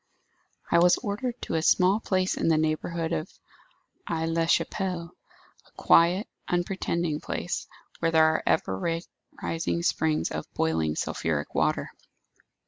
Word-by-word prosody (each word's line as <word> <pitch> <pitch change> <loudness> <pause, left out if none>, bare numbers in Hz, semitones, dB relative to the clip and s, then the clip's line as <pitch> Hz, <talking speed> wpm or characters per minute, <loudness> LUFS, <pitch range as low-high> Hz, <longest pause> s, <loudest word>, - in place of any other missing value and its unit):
"I 170 - +5
was 175 +1 +5
ordered 235 +4 -3
to - - -4
a 160 - +1
small 185 +5 +4
place 185 -3 0
in - - -1
the 160 -1 +4
neighbourhood 160 +1 -1
of 80 - -3 0.8
Aix 165 -1 -1
la 165 0 +1
Chapelle; 175 -1 -1 0.5
a - - -25
quiet, 175 +5 +4 0.2
unpretending 175 -3 -1
place, - - -4 0.3
where 165 - +1
there 160 -1 +5
are 160 - +2
ever 160 - +1 0.5
rising 165 +1 -1
springs 160 -2 +1
of - - -5
boiling, 80 -1 0
sulphuric 75 -2 -2
water. - - 0
165 Hz, 135 wpm, -27 LUFS, 160-180 Hz, 0.8 s, I